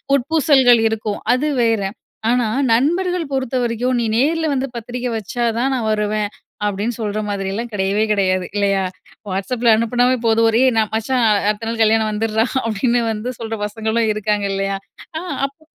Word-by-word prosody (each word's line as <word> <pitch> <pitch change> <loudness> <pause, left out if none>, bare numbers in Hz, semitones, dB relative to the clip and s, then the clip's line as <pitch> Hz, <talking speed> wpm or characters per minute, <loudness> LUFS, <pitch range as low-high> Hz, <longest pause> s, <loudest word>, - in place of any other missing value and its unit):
உட்பூசல்கள் 270 -3 +4
இருக்கும். 215 -2 -3
அது 270 +5 0
வேற. 225 -3 +2 0.5
ஆனா 245 -2 +2 0.3
நண்பர்கள் 345 +5 +1
பொறுத்தவரைக்கும் 250 -1 0
"நீ 230 - 0
நேர்ல 320 +5 +2
வந்து 270 0 -1
பத்திரிக்க 245 +2 -4
வச்சா 235 +3 -4 0.2
தான் 265 +3 +1
நா 255 - -1
வருவேன்."அப்டின்னு 210 0 -2
சொல்ற 210 -1 -2
மாதிரியலாம் 200 +4 -3
கெடயவே 200 +2 +1
கெடயாது 185 -2 +1
இல்லையா? 195 -1 +1 0.5
WhatsAppல 230 +5 +1
அனுப்புனாவே 245 +3 +2
போதும். 225 0 +4
"ஒரே 230 +3 +2 0.2
நா 220 - +5
மச்சா 225 +4 -1 0.3
அடுத்த 215 +2 -2
நாள் 230 0 -2
கல்யாணம் 220 0 +3
வந்துர்ரா" 220 +1 0 0.2
அப்டின்னு 235 +3 +1
வந்து 220 +3 -4
சொல்ற 225 -1 -4
பசங்களும் 220 +1 -1
இருக்காங்க, 210 -1 -1
இல்லையா? 195 0 -1 0.4
அ - - -2 0.3
அப்போ 280 +3 -22
225 Hz, 145 wpm, -19 LUFS, 210-250 Hz, 0.5 s, நா